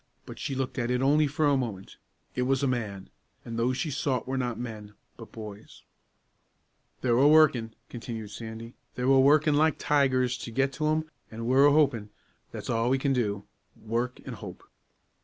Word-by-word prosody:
But - - -10
she 135 - -3
looked 130 0 -3
at 120 -1 -1
it 125 +1 +1
only 150 +2 +4
for 150 +2 0
a 145 -1 +4
moment. 110 -8 -4 0.4
It 125 - -2
was 135 0 +1
a - - +3
man; 105 -6 -3 0.3
and 115 - -6
those 125 +2 0
she 155 - -2
sought 130 -3 -1
were 135 - -2
not 125 -3 -2
men, 105 -3 -7 0.2
but 115 - -12
boys. 105 -2 -10 1.2
"They're 120 -2 +2
a 140 - +6
workin'," 140 -8 +4
continued 115 -3 -7
Sandy, 115 +2 -8 0.2
"they're 125 - -2
a 135 0 +5
workin' 150 +3 +5
like 155 0 +3
tigers 130 -4 +1
to - - -6
get 135 +4 0
to 155 +1 -1
'em, 155 +1 +1 0.3
an' 115 +1 -6
we're 135 +4 +5
a - - +5
hopin'; 130 -8 +2 0.4
that's - - -7
a' 115 +1 0
we 135 - +3
can 135 0 0
do 105 -5 -1 0.3
work 120 +3 -2
an' - - -6
hope." - - -9
125 Hz, 190 wpm, -28 LUFS, 115-140 Hz, 1.2 s, a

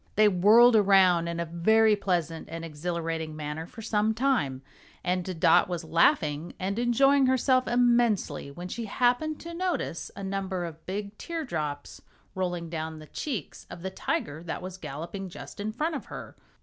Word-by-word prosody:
They 215 +1 +6
whirled 215 +6 +6
around 190 -5 +5
in 170 0 -3
a 170 - -1
very 215 +6 +4
pleasant 175 -5 -2
and 165 +1 -6
exhilarating 165 0 -3
manner 155 +2 -5
for 225 +3 -11
some 215 0 +1
time, 225 - 0 0.4
and 180 -1 -2
Dot - - +5
was 175 -1 -3
laughing 160 - +2
and 195 +4 -2
enjoying 270 +3 +4
herself 255 0 +3
immensely 235 - +2
when 175 +6 -8
she 230 +5 -5
happened 250 +8 +1
to 340 0 -7
notice 350 - -2
a 200 - -7
number 190 -2 -2
of 165 -1 -9
big 200 +2 -4
teardrops 160 - -4 0.3
rolling 175 -2 -2
down 160 -1 -5
the 155 - -11
cheeks 220 - -5
of 170 - -9
the 190 - -3
tiger 150 -4 -3
that 170 +1 -5
was 185 0 -7
galloping 170 +6 -6
just 175 - -10
in 210 +2 -2
front 310 +8 -2
of 280 - -5
her. - - -9
185 Hz, 165 wpm, -28 LUFS, 165-230 Hz, 0.4 s, They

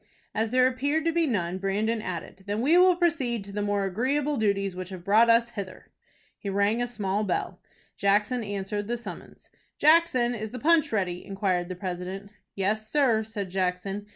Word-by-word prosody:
As 220 0 0
there 255 +2 +4
appeared 285 +5 0
to 330 - +3
be 330 -1 +2
none, 185 -7 -1
Brandon 215 +4 0
added, 185 +1 -7
"Then 205 +1 -1
we 295 +7 +4
will 365 0 +6
proceed 280 - 0
to 200 - -10
the 205 +1 -3
more 205 -1 0
agreeable 270 +9 0
duties 200 -4 0
which 185 0 -6
have 185 -3 -8
brought 220 +5 +5
us 230 +1 +4
hither." 195 -4 -8 0.5
He 200 - -5
rang 200 +4 +1
a 245 - 0
small 210 -3 -2
bell. 190 - -2 0.4
Jackson 210 +5 +1
answered 205 0 -4
the 240 +1 -1
summons. 235 - -11 0.3
"Jackson, 300 -6 +4
is 220 -2 -4
the - - -4
punch 310 +2 +3
ready?" 185 -5 -1
inquired 190 -3 -1
the 185 - -4
president. 185 +2 -5 0.2
"Yes, 215 +3 -1
sir," 255 -6 +3
said 210 -4 -6
Jackson. 190 +2 -2
210 Hz, 180 wpm, -27 LUFS, 195-245 Hz, 0.5 s, will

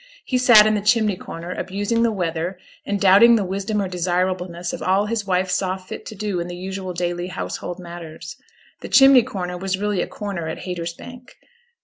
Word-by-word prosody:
He 255 - 0
sat 240 -4 +8
in 215 - +3
the 210 - 0
chimney 210 -1 +2
corner, 170 0 -8
abusing 205 +5 -2
the 230 -1 +3
weather 175 -2 -3 0.3
and 205 0 -1
doubting 200 +5 +7
the 210 -4 0
wisdom 200 +3 -2
or 195 - -1
desirableness 180 -1 -2
of - - -6
all 195 +2 +2
his 215 -1 -3
wife 185 0 0
saw 185 0 0
fit 185 -1 -9
to 215 - -8
do 205 -2 -2
in 170 - -3
the 175 - -6
usual 190 0 -5
daily 175 0 -2
household 180 -1 -5
matters. 170 -2 -9 0.4
The - - -8
'chimney 270 -2 +7
corner' 180 -7 -5
was 190 0 -2
really 205 -2 -1
a - - -2
corner 195 -6 -5
at 160 - -4
Haytersbank. 180 +8 -7
190 Hz, 195 wpm, -21 LUFS, 175-210 Hz, 0.4 s, sat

